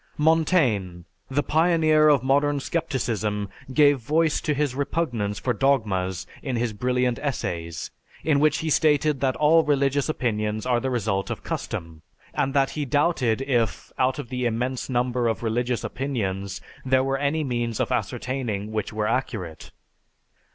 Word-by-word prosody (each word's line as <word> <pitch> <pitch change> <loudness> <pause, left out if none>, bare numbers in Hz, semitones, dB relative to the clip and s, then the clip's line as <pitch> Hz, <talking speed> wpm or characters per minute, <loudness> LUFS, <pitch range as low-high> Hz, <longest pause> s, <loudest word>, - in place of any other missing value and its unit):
Montaigne, 150 - +2 0.3
the 145 +2 0
pioneer 155 -1 +4
of 140 -4 +4
modern 145 +2 +2
scepticism, 115 - -2 0.2
gave 145 0 +5
voice 155 +5 +1
to 150 - 0
his 145 -2 0
repugnance 125 -8 -1
for 125 - -1
dogmas 105 -10 0 0.2
in 130 -4 -3
his 120 -1 -1
brilliant 125 +2 0
Essays, 85 - -3 0.3
in 150 -3 +3
which 150 0 +3
he 160 - -2
stated 150 -2 +3
that 130 -2 +1
all 160 +2 +5
religious 140 -1 +1
opinions 110 -6 -1
are 125 -2 +2
the 130 - -2
result 110 -5 -1
of - - -5
custom; 80 -1 -5 0.3
and 135 +1 -1
that 135 -1 +3
he 150 - -3
doubted 135 -4 +1
if, 120 -5 -1
out 130 +2 +2
of 145 -6 -6
the 125 -1 -1
immense 125 +3 -2
number 125 -1 +1
of 115 -1 -1
religious 120 +2 -1
opinions, 100 -8 -3 0.2
there 130 0 +3
were 135 0 -1
any 145 +2 0
means 120 -4 -2
of - - 0
ascertaining 120 -3 -2
which 110 -2 -2
were 110 0 -2
accurate. 105 - -3
130 Hz, 150 wpm, -24 LUFS, 110-145 Hz, 0.3 s, gave